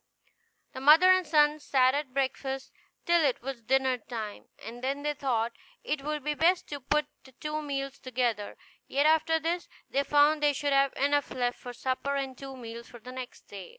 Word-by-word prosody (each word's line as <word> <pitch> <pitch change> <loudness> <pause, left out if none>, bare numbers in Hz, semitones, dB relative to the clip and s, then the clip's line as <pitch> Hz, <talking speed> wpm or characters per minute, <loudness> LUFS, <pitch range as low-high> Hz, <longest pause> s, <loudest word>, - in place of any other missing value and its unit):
The 260 - -7
mother 320 +7 +8
and 370 -2 +3
son 300 0 +4
sat 260 -3 +3
at 285 -2 -2
breakfast 270 0 -2 0.3
till 340 -1 +4
it 265 -4 +1
was 265 -2 -5
dinner 260 +2 +1
time, 220 -2 -6
and 240 +3 -10
then 275 +2 -2
they 295 0 0
thought 245 -5 -1 0.3
it 290 -2 -2
would 300 -1 -3
be 300 +1 0
best 345 +4 +2
to 285 - -5
put 300 +3 +1 0.2
the 265 - -17
two 305 +2 -4
meals 275 -2 -4
together; 240 -5 -2 0.3
yet 280 +2 +1
after 320 +1 +3
this 340 +2 -2 0.2
they 280 - +2
found 295 +1 +4
they 295 -1 +4
should 285 0 -1
have 275 0 +3
enough 285 +1 +1
left 245 -1 -2
for 245 - -7
supper, 260 +3 -2
and 270 -2 -3
two 270 0 -9
meals 235 -1 -8
for 240 - -12
the 250 +3 -10
next 255 -1 -8
day. 195 -3 -10
275 Hz, 195 wpm, -29 LUFS, 255-295 Hz, 0.3 s, mother